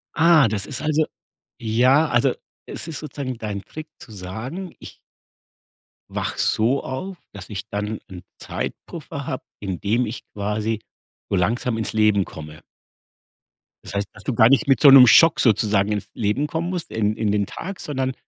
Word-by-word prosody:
Ah, 160 -5 +5
das 100 -2 -1
ist 130 - -4
also 155 0 +1 0.6
ja, 130 +7 +3
also, 120 -3 +2 0.3
es - - -7
ist 160 - -4
sozusagen 135 -4 -5
dein 105 -3 -5
Trick 155 0 -9
zu 120 - -14
sagen 110 - -7
ich - - -12 1.1
wache - - -4
so 120 +6 +1
auf, 180 +9 -5
dass 100 0 -10
ich 105 0 -6
dann 105 +1 -3
'n 90 -2 -10 0.2
Zeitpuffer - - -6
habe, - - -4 0.2
in 95 -3 -4
dem 115 +5 +1
ich 110 +2 -6
quasi 105 +2 -2 0.5
so - - 0
langsam 115 +5 0
ins 110 - -3
Leben 105 -3 +3
komme. 75 0 -10 1.2
Das - - -9
heißt, 100 0 -1
dass 100 - -15
du 130 - -2
gar 110 +2 +6
nicht 140 +3 +3
mit 135 - +4
so 145 - +9
'nem 130 -2 +10
Schock 165 +6 +7
sozusagen 105 -3 +2
ins 105 -1 -2
Leben 110 +6 0
kommen 165 +3 -3
musst, 180 -3 -5
in 110 -1 0
in 110 -2 0
den 100 -1 +1
Tag, 190 - -7
sondern 130 -3 -2
115 Hz, 170 wpm, -22 LUFS, 105-140 Hz, 1.2 s, nem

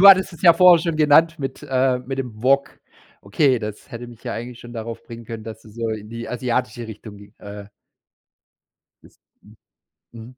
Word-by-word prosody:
Du 200 - +10
hattest 190 -1 +7
es 165 - -13
ja 170 -2 +9
vorher 175 -1 +7
schon 165 -2 -1
genannt 160 +2 +4
mit 135 -2 -5
äh, 130 -1 +1
mit 130 +2 -6
dem 115 -4 -6
Wok. 140 +2 +2 0.4
Okay, 130 +6 +2
das 105 -1 -7
hätte 120 +1 -7
mich 120 -2 -14
ja - - -3
eigentlich 120 +1 -7
schon 120 - -11
darauf 115 0 -6
bringen 115 0 -10
können, 110 -1 -7
dass 110 0 -9
du 110 - -15
so 115 +1 -4
in 110 -1 -5
die 115 0 -6
asiatische 120 -2 -2
Richtung 110 -1 -10
ging 100 0 -16
äh 105 0 -9 1.4
isst. - - -21 0.2
Mhm 105 - -18 0.6
mhm. 115 -1 -10
120 Hz, 195 wpm, -22 LUFS, 110-140 Hz, 1.4 s, Du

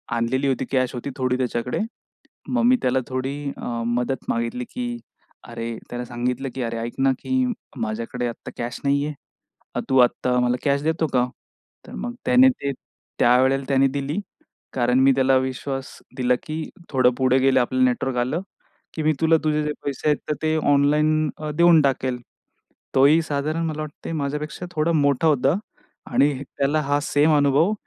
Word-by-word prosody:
आणलेली 130 +4 0
होती, 130 -1 0
कॅश 130 -2 +1
होती 125 +3 -4
थोडी 130 -1 0
त्याच्याकडे. 125 -1 -2 0.7
मग 250 -2 +1
मी 250 +1 +6
त्याला 130 +1 +2
थोडी 130 +1 -3 0.2
अ, - - -7 0.2
मदत 125 +2 -1
मागितली, 115 +1 -1
की 245 -1 -4 0.5
अरे, 115 -1 -5
त्याला 120 0 -4
सांगितलं, 125 +2 -3
की 130 - -3
"अरे 115 0 -3
ऐक 115 +1 -4
ना, 135 0 +4
की - - -11 0.5
माझ्याकडे 115 +3 -3
आत्ता 115 - -7
कॅश 120 +1 -4
नाहीये. 140 +2 +1 0.8
तू 130 - +3
आत्ता 125 0 +3
मला 125 0 +2
कॅश 140 0 +2
देतो 160 0 0
का?" 125 -1 +3 0.6
तर - - -11
मग 240 - -4
त्याने 255 +1 +6
ते 140 - -3 0.5
त्यावेळेला 130 +3 +4
त्याने 135 0 +4
दिली 140 +6 -2 0.5
कारण 125 0 +2
मी 135 +1 +6
त्याला 130 0 +4
विश्वास 130 +1 -4 0.2
दिला, 125 0 +2
की 155 +1 -5 0.2
"थोडं 130 -3 +4
पुढे 130 0 +3
गेलं 130 0 +4
आपलं 130 +1 +1
नेटवर्क 125 0 0
आलं, 130 +9 0 0.5
की 160 - -3
मी 155 +1 +3
तुला 160 0 +5
तुझे 150 0 +1
जे 150 - -1
पैसे 140 +1 -4
आहेत 150 - +4
तर - - +2
ते 155 0 +1 0.2
ऑनलाईन 150 +2 +3 0.3
देऊन 170 -2 +6
टाकेल." 130 -2 0 0.8
तोही 140 +5 +6
साधारण 155 +2 -2
मला 155 -1 -3
वाटतंय 155 +2 -7
माझ्यापेक्षा 150 +3 -3
थोडा 160 +1 +1
मोठा 145 0 +2
होता 140 +1 +3 0.6
आणि 140 +4 +4
त्याला 145 +3 0
हा 145 +1 +1
सेम 150 +1 +3
अनुभव 145 +7 +3
135 Hz, 165 wpm, -23 LUFS, 125-150 Hz, 0.8 s, मी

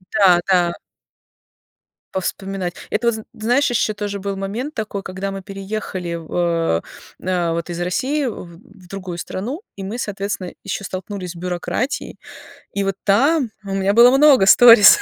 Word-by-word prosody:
Да, 185 -1 +4
да. 175 -2 +3 1.4
Повспоминать. 190 -1 -3 0.2
Это 235 +3 +1
вот 235 - +2
з 220 - -6
знаешь, 245 +5 +1
еще 220 -2 +1
тоже 205 -1 -4
был 200 0 -3
момент 220 +10 -4
такой, 205 -2 -4
когда 190 +1 -4
мы 195 0 -6
переехали 195 -3 -5
в 165 -2 -8
а, 165 - +1 0.4
а, 175 -2 0
вот, 170 +1 -3
из 170 - -4
России 265 +12 0
в-в 185 -2 -9
другую 185 -2 -6
страну, 240 - -5 0.2
и 195 - -7
мы, 220 +5 -5
соответственно, 200 -3 -4
еще 200 0 -4
столкнулись 185 -1 -5
с - - -16
бюрократией. 180 +9 -3 0.6
И 200 - -1
вот 195 -1 -1
там 260 +6 +3
у 195 -1 -5
меня 195 +1 +1
было 240 +3 +7
много 275 -8 +6
сторис. 230 0 +9
195 Hz, 155 wpm, -20 LUFS, 180-220 Hz, 1.4 s, сторис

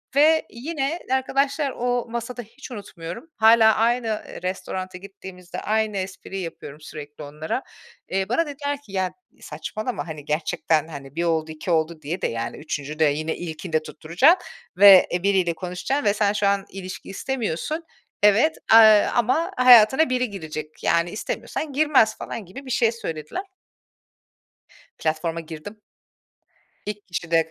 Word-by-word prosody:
ve 315 +3 +5
yine, 285 +5 -3
arkadaşlar 275 +2 +1
o 245 0 -1
masada, 235 +1 -4
hiç 250 +5 -13
unutmuyorum 200 - -8
hâlâ 220 0 +6
aynı, 235 +2 +1 0.2
eee, - - -9
restorana 185 0 -4
gittiğimizde 190 -2 -10
aynı 215 -1 0
espriyi 190 0 -5
yapıyorum 155 -3 -8
sürekli 150 0 -9
onlara. 150 - -4 0.5
Eee, 190 +1 -1
bana 290 +8 +2
dediler 285 0 -4
ki 250 - -17
"Ya 190 -1 -1 0.3
saçmalama, 220 0 -5
hani, 155 -3 -8
gerçekten, 155 0 0
hani, 140 -3 -10
1 170 - -1
oldu, 160 -2 0
2 155 +3 -5
oldu 160 0 0
diye 160 +5 -4
de, - - +1
yani 115 0 -4
3'üncüde 150 +1 -2
yine 155 +2 0
ilkinde 160 -1 -3
tutturacaksın 175 - +2 0.3
ve, 195 -1 +9
eee, 175 0 -1
biriyle 190 -4 +2
konuşacaksın 180 - -3
ve 205 - +4
sen 205 -1 +1
şu 205 -1 +1
an 200 0 +1
ilişki 185 -1 -8
istemiyorsun. 265 - -3 0.4
Evet, 220 +10 +5 0.2
eee, 220 -2 +8
ama 255 - +1
hayatına 255 +4 +7
biri 250 -1 0
girecek, 155 -5 -7
yani 170 +1 +2
istemiyorsan 285 +6 -4
girmez," 275 -7 +3
falan 220 - -6
gibi 265 +11 -10
bir 260 - -6
şey 230 -1 +3
söylediler. 165 - -5 1.6
Platforma 160 +1 -1
girdim. 165 +6 -9 1.1
İlk 210 -1 -6
kişi 170 -2 -5
de 165 -1 +2
195 Hz, 145 wpm, -23 LUFS, 165-245 Hz, 1.6 s, ve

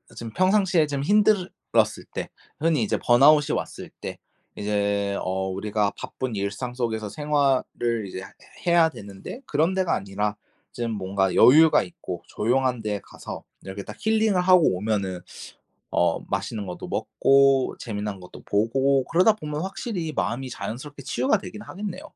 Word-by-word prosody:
지금 115 -1 -7
평상시에 185 -3 +3
좀 140 -1 -2
힘들었을 205 +2 +2
때 - - -4 0.3
흔히 155 -5 +2
이제 105 - 0
번아웃이 145 +5 +5
왔을 - - -5
때 - - -6 0.4
이제 100 -1 0
어 95 +1 -2
우리가 100 +1 -1
바쁜 130 -4 -5
일상 105 +5 -3
속에서 110 -4 -2
생활을 135 -5 0
이제 95 - -6
해 - - -8 0.5
해야 170 -1 +5
되는데 100 - -9
그런 160 +5 +1
데가 190 -2 +1
아니라 100 +1 -2 0.4
좀 120 -1 -3
뭔가 95 -2 0
여유가 150 +7 +7
있고 90 - -7
조용한 125 +1 0
데 105 -2 -2
가서 - - -9 0.2
이렇게 95 +1 -7
딱 105 - -9
힐링을 220 -3 +2
하고 180 - +5
오면은 95 -3 -2 0.7
어 - - +2
맛있는 105 -3 -3
것도 90 -1 -6
먹고, 135 -1 +3
재미난 105 -3 -4
것도 90 - -12
보고 130 +6 +2
그러다 185 +6 +4
보면 150 -6 -5
확실히 190 -4 -4
마음이 120 +6 -2
자연스럽게 140 +5 -6
치유가 130 - +1
되긴 210 +1 -9
하겠네요. 200 -2 -6
125 Hz, 325 characters per minute, -25 LUFS, 105-160 Hz, 0.7 s, 여유가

